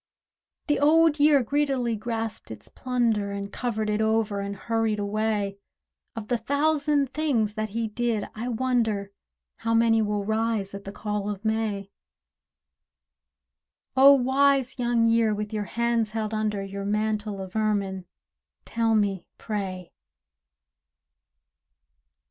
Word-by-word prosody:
The 295 Hz, -, +1 dB
Old 310 Hz, +1 st, +4 dB
Year 290 Hz, -2 st, +5 dB
greedily 265 Hz, -3 st, 0 dB
grasped 225 Hz, 0 st, -4 dB
his 110 Hz, -2 st, -9 dB
plunder, 230 Hz, -5 st, 0 dB
And 200 Hz, 0 st, -5 dB
covered 220 Hz, -3 st, -2 dB
it 210 Hz, 0 st, 0 dB
over 220 Hz, -2 st, +1 dB
and 200 Hz, 0 st, -4 dB
hurried 225 Hz, +1 st, -1 dB
away: 205 Hz, -1 st, -1 dB, 0.6 s
Of 220 Hz, -2 st, -6 dB
the 240 Hz, 0 st, 0 dB
thousand 285 Hz, +2 st, +1 dB
things 250 Hz, -9 st, 0 dB
that 215 Hz, 0 st, -3 dB
he 225 Hz, +2 st, -2 dB
did, 220 Hz, -1 st, -1 dB
I 225 Hz, +3 st, -5 dB
wonder 230 Hz, -5 st, 0 dB, 0.5 s
How 230 Hz, 0 st, 0 dB
many 225 Hz, -1 st, +4 dB
will 210 Hz, -1 st, -1 dB
rise 220 Hz, -2 st, -1 dB
at 200 Hz, 0 st, -8 dB
the 195 Hz, -, -6 dB
call 210 Hz, 0 st, -3 dB
of 205 Hz, +1 st, -6 dB
May? 215 Hz, -3 st, -1 dB, 2.0 s
O 275 Hz, +2 st, +8 dB
wise 265 Hz, 0 st, +2 dB
Young 240 Hz, -1 st, +2 dB
Year, 230 Hz, -2 st, +3 dB
with 210 Hz, +1 st, -5 dB
your 210 Hz, -1 st, -2 dB
hands 235 Hz, 0 st, 0 dB
held 215 Hz, 0 st, -3 dB
under 210 Hz, -2 st, -1 dB
Your 195 Hz, 0 st, -6 dB
mantle 210 Hz, 0 st, -1 dB
of 190 Hz, +1 st, -8 dB
ermine, 200 Hz, -4 st, -1 dB, 0.6 s
tell 230 Hz, -1 st, +1 dB
me, 200 Hz, -3 st, 0 dB
pray! 190 Hz, -4 st, -5 dB
220 Hz, 130 wpm, -26 LUFS, 205-240 Hz, 2.0 s, O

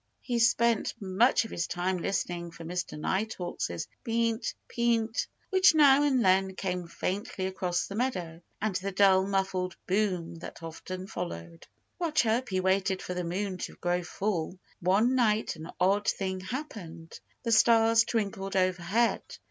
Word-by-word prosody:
He 240 Hz, -2 st, -1 dB
spent 235 Hz, -1 st, +2 dB
much 215 Hz, +5 st, +3 dB
of -, -, -9 dB
his 170 Hz, -, -2 dB
time 180 Hz, +1 st, -1 dB
listening 175 Hz, -2 st, -2 dB
for 165 Hz, 0 st, -11 dB
Mr. 175 Hz, -1 st, -4 dB
Nighthawk's 190 Hz, 0 st, -2 dB, 0.3 s
Peent! 230 Hz, 0 st, 0 dB
Peent! 230 Hz, -1 st, 0 dB, 0.2 s
which 375 Hz, -3 st, +6 dB
now 285 Hz, -2 st, +7 dB
and 265 Hz, -6 st, +2 dB
then 190 Hz, 0 st, +3 dB
came 180 Hz, -3 st, -3 dB
faintly 190 Hz, +2 st, -3 dB
across 185 Hz, -2 st, -1 dB
the -, -, -8 dB
meadow, 180 Hz, -9 st, -2 dB, 0.2 s
and 215 Hz, -3 st, -1 dB
the 195 Hz, +1 st, -4 dB
dull, 190 Hz, -1 st, +4 dB
muffled 190 Hz, -2 st, -1 dB
boom 185 Hz, -4 st, 0 dB
that 165 Hz, -, -9 dB
often 185 Hz, +3 st, -6 dB
followed. 85 Hz, -, -7 dB, 0.3 s
While 335 Hz, -3 st, -1 dB
Chirpy 235 Hz, -7 st, +1 dB
waited 190 Hz, 0 st, +1 dB
for 180 Hz, -, -4 dB
the 180 Hz, 0 st, -3 dB
moon 185 Hz, +2 st, -3 dB
to -, -, -5 dB
grow 175 Hz, 0 st, 0 dB
full, 180 Hz, -1 st, -3 dB, 0.2 s
one 200 Hz, +8 st, +3 dB
night 220 Hz, -6 st, +2 dB
an 160 Hz, +1 st, -9 dB
odd 195 Hz, +3 st, +2 dB
thing 190 Hz, -1 st, -1 dB
happened. 185 Hz, -, -7 dB, 0.2 s
The 230 Hz, -, -1 dB
stars 225 Hz, 0 st, +5 dB
twinkled 200 Hz, -4 st, -2 dB
overhead. 185 Hz, +5 st, +1 dB
195 Hz, 150 wpm, -29 LUFS, 180-225 Hz, 0.3 s, now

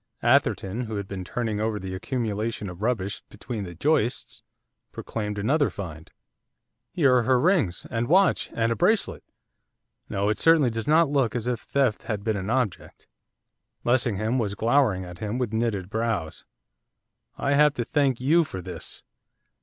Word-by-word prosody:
Atherton, 105 Hz, +6 st, +2 dB
who 110 Hz, -1 st, -5 dB
had 100 Hz, -1 st, -4 dB
been 95 Hz, -2 st, -5 dB
turning 110 Hz, +1 st, -3 dB
over 110 Hz, 0 st, -1 dB
the 95 Hz, -1 st, -6 dB
accumulation 110 Hz, -1 st, -3 dB
of 90 Hz, +2 st, -12 dB
rubbish 105 Hz, -4 st, -1 dB
between 105 Hz, -1 st, -6 dB
the 85 Hz, -1 st, -9 dB
joists, 130 Hz, -, 0 dB, 0.5 s
proclaimed 105 Hz, -2 st, -4 dB
another 140 Hz, +8 st, +2 dB
find. 80 Hz, -5 st, -8 dB, 0.8 s
'Here 135 Hz, -7 st, +4 dB
are -, -, +3 dB
her 125 Hz, +2 st, +3 dB
rings, 155 Hz, -, +1 dB
and 115 Hz, -1 st, -1 dB
watch, 190 Hz, +4 st, +3 dB
and 115 Hz, 0 st, +1 dB
a -, -, +1 dB
bracelet, 215 Hz, -, +1 dB, 0.9 s
no, 100 Hz, +1 st, 0 dB
it 105 Hz, -, 0 dB
certainly 160 Hz, -7 st, +5 dB
does 115 Hz, +2 st, -4 dB
not 155 Hz, 0 st, +4 dB
look 135 Hz, -6 st, +1 dB
as 120 Hz, -1 st, -2 dB
if 125 Hz, -2 st, -1 dB
theft 130 Hz, -5 st, 0 dB
had 105 Hz, -3 st, -4 dB
been 110 Hz, 0 st, 0 dB
an 95 Hz, 0 st, -4 dB
object.' 125 Hz, -7 st, -2 dB, 0.8 s
Lessingham 120 Hz, -1 st, +1 dB
was 100 Hz, -3 st, -1 dB
glowering 115 Hz, -4 st, +2 dB
at 90 Hz, 0 st, -10 dB
him 105 Hz, +2 st, -3 dB
with 125 Hz, -4 st, -2 dB
knitted 110 Hz, -5 st, -1 dB
brows. 110 Hz, -8 st, -2 dB, 0.9 s
'I 140 Hz, 0 st, 0 dB
have 150 Hz, 0 st, +4 dB
to 120 Hz, -, -1 dB
thank 135 Hz, -1 st, +1 dB
you 155 Hz, +7 st, +4 dB
for 95 Hz, -11 st, -7 dB
this. 90 Hz, -2 st, -7 dB
115 Hz, 160 wpm, -25 LUFS, 100-130 Hz, 0.9 s, certainly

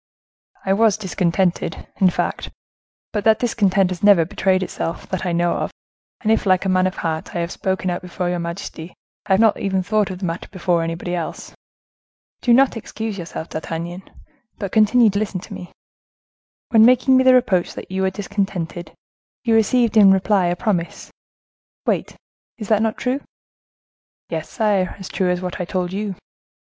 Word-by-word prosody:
"I 190 Hz, -, +2 dB
was 215 Hz, 0 st, +3 dB
discontented, 180 Hz, -3 st, -1 dB
in 190 Hz, -, +5 dB
fact; -, -, -2 dB, 0.6 s
but 210 Hz, -2 st, -1 dB
that 220 Hz, 0 st, +5 dB
discontent 195 Hz, -5 st, +2 dB
has 180 Hz, -, -5 dB
never 200 Hz, -5 st, +6 dB
betrayed 185 Hz, +2 st, +1 dB
itself, 165 Hz, -, -4 dB
that 185 Hz, 0 st, -3 dB
I -, -, 0 dB
know 170 Hz, 0 st, +1 dB
of, -, -, -2 dB, 0.5 s
and 220 Hz, -, +1 dB
if, 225 Hz, -, +1 dB
like 185 Hz, 0 st, +3 dB
a -, -, +1 dB
man 185 Hz, 0 st, +3 dB
of 185 Hz, -, -4 dB
heart, 160 Hz, -1 st, -4 dB
I -, -, 0 dB
have 170 Hz, +1 st, -3 dB
spoken 190 Hz, -1 st, -2 dB
out 175 Hz, -, -3 dB
before 180 Hz, 0 st, -4 dB
your 175 Hz, 0 st, -1 dB
majesty, 170 Hz, -1 st, -6 dB, 0.3 s
I 190 Hz, -, +3 dB
have 190 Hz, -, +3 dB
not 220 Hz, -2 st, +4 dB
even 190 Hz, -1 st, 0 dB
thought 210 Hz, +1 st, +1 dB
of 185 Hz, -, -5 dB
the 185 Hz, -, -4 dB
matter 165 Hz, 0 st, -4 dB
before 175 Hz, -3 st, 0 dB
anybody 165 Hz, +2 st, -3 dB
else." 170 Hz, -3 st, -5 dB, 0.9 s
"Do 245 Hz, -, +2 dB
not 260 Hz, +2 st, +5 dB
excuse 220 Hz, -2 st, -5 dB
yourself, 165 Hz, -1 st, -6 dB
D'Artagnan, 170 Hz, +3 st, -5 dB, 0.6 s
but 200 Hz, -4 st, -4 dB
continue 220 Hz, +1 st, +5 dB
to 200 Hz, -, -1 dB
listen 205 Hz, -3 st, -2 dB
to -, -, -10 dB
me. 180 Hz, -, -9 dB, 1.0 s
When 220 Hz, -1 st, +6 dB
making 255 Hz, +2 st, +5 dB
me 260 Hz, -, +5 dB
the 260 Hz, 0 st, +6 dB
reproach 215 Hz, -8 st, +1 dB
that -, -, -9 dB
you 190 Hz, 0 st, -1 dB
were 190 Hz, -, +2 dB
discontented, 190 Hz, -4 st, -4 dB, 0.5 s
you 230 Hz, -2 st, +2 dB
received 225 Hz, +1 st, +3 dB
in 200 Hz, -2 st, +8 dB
reply 195 Hz, -1 st, +2 dB
a 175 Hz, -, 0 dB
promise:—'Wait.'—Is 200 Hz, +2 st, -6 dB
that 215 Hz, -1 st, +3 dB
not 220 Hz, -1 st, 0 dB
true?" 255 Hz, +3 st, -1 dB, 1.1 s
"Yes, 160 Hz, -2 st, -4 dB
sire, 205 Hz, -4 st, 0 dB
as 190 Hz, -2 st, -8 dB
true 185 Hz, -2 st, 0 dB
as 180 Hz, 0 st, 0 dB
what 180 Hz, +1 st, -4 dB
I -, -, -2 dB
told 180 Hz, 0 st, -2 dB
you." 200 Hz, -1 st, -3 dB
190 Hz, 180 wpm, -21 LUFS, 175-215 Hz, 1.1 s, in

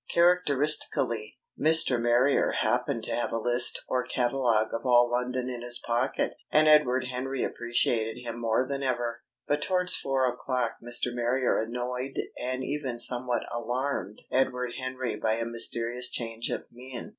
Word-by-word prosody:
Characteristically, 150 Hz, -10 st, +2 dB, 0.2 s
Mr. 155 Hz, -6 st, +4 dB
Marrier 120 Hz, +4 st, +3 dB
happened 125 Hz, -1 st, 0 dB
to -, -, -3 dB
have 120 Hz, -, -1 dB
a -, -, -1 dB
list 120 Hz, +2 st, +3 dB
or 125 Hz, -1 st, 0 dB
catalogue 120 Hz, -4 st, 0 dB
of 115 Hz, -, -3 dB
all 120 Hz, -2 st, +4 dB
London 125 Hz, +1 st, -1 dB
in 125 Hz, -2 st, -5 dB
his 120 Hz, 0 st, -3 dB
pocket, 120 Hz, +3 st, -1 dB, 0.2 s
and 155 Hz, 0 st, +4 dB
Edward 130 Hz, -5 st, +4 dB
Henry 130 Hz, +1 st, -3 dB
appreciated 120 Hz, -1 st, -1 dB
him 120 Hz, -1 st, -7 dB
more 115 Hz, +3 st, +1 dB
than 140 Hz, 0 st, -3 dB
ever. 120 Hz, -3 st, -2 dB, 0.2 s
But 145 Hz, 0 st, 0 dB
towards 180 Hz, -1 st, +3 dB
four 135 Hz, -1 st, 0 dB
o'clock 125 Hz, -1 st, -2 dB
Mr. 120 Hz, +1 st, 0 dB
Marrier 120 Hz, +1 st, +1 dB
annoyed 125 Hz, +3 st, -4 dB, 0.2 s
and 130 Hz, +1 st, -3 dB
even 135 Hz, -4 st, -3 dB
somewhat 120 Hz, 0 st, +1 dB
alarmed 120 Hz, -3 st, -3 dB
Edward 125 Hz, -1 st, 0 dB
Henry 130 Hz, -4 st, -3 dB
by 110 Hz, -, 0 dB
a 115 Hz, +1 st, -2 dB
mysterious 115 Hz, +1 st, 0 dB
change 115 Hz, -1 st, -4 dB
of -, -, -3 dB
mien. 125 Hz, +1 st, -9 dB
125 Hz, 150 wpm, -28 LUFS, 120-130 Hz, 0.2 s, Mr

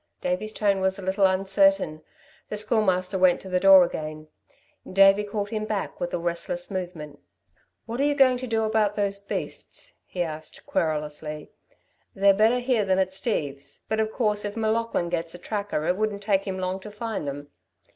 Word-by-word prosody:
Davey's 270 Hz, -6 st, -2 dB
tone 200 Hz, -2 st, +1 dB
was 190 Hz, +1 st, +1 dB
a 195 Hz, -, -8 dB
little 190 Hz, +1 st, +3 dB
uncertain. 195 Hz, -4 st, +2 dB, 0.5 s
The 210 Hz, -, -3 dB
Schoolmaster 195 Hz, -3 st, +1 dB
went 185 Hz, -1 st, +5 dB
to 190 Hz, -, -9 dB
the 180 Hz, 0 st, +1 dB
door 195 Hz, -1 st, +8 dB
again. 155 Hz, -2 st, -5 dB, 0.6 s
Davey 195 Hz, +2 st, +6 dB
called 205 Hz, 0 st, -3 dB
him 215 Hz, -1 st, -2 dB
back 210 Hz, -2 st, -3 dB
with 175 Hz, -, -2 dB
a -, -, -1 dB
restless 175 Hz, +2 st, -3 dB
movement. 170 Hz, -6 st, -5 dB, 0.7 s
"What 235 Hz, +2 st, -5 dB
are -, -, +3 dB
you 290 Hz, 0 st, +2 dB
going 260 Hz, -3 st, +5 dB
to 255 Hz, -, -5 dB
do 225 Hz, -1 st, 0 dB
about 215 Hz, -1 st, +1 dB
those 200 Hz, -1 st, -1 dB
beasts?" -, -, -6 dB
he 180 Hz, -, -2 dB
asked 155 Hz, -1 st, -8 dB
querulously. 150 Hz, -1 st, -3 dB, 0.6 s
"They're 195 Hz, 0 st, +5 dB
better 220 Hz, +5 st, +4 dB
here 245 Hz, -3 st, +1 dB
than 190 Hz, -1 st, +1 dB
at 190 Hz, -1 st, +1 dB
Steve's, 140 Hz, -, -3 dB
but 220 Hz, -, 0 dB
of 220 Hz, 0 st, 0 dB
course 210 Hz, -4 st, +1 dB
if 205 Hz, +2 st, -4 dB
M'Laughlin 220 Hz, -5 st, 0 dB
gets 170 Hz, 0 st, -3 dB
a -, -, -7 dB
tracker 200 Hz, -4 st, -3 dB
it 180 Hz, -, +1 dB
wouldn't 210 Hz, -1 st, -2 dB
take 195 Hz, -2 st, +1 dB
him 190 Hz, -1 st, -3 dB
long 185 Hz, 0 st, -2 dB
to 210 Hz, -, -9 dB
find 210 Hz, -6 st, -4 dB
them. 145 Hz, +1 st, -6 dB
195 Hz, 185 wpm, -25 LUFS, 175-215 Hz, 0.7 s, door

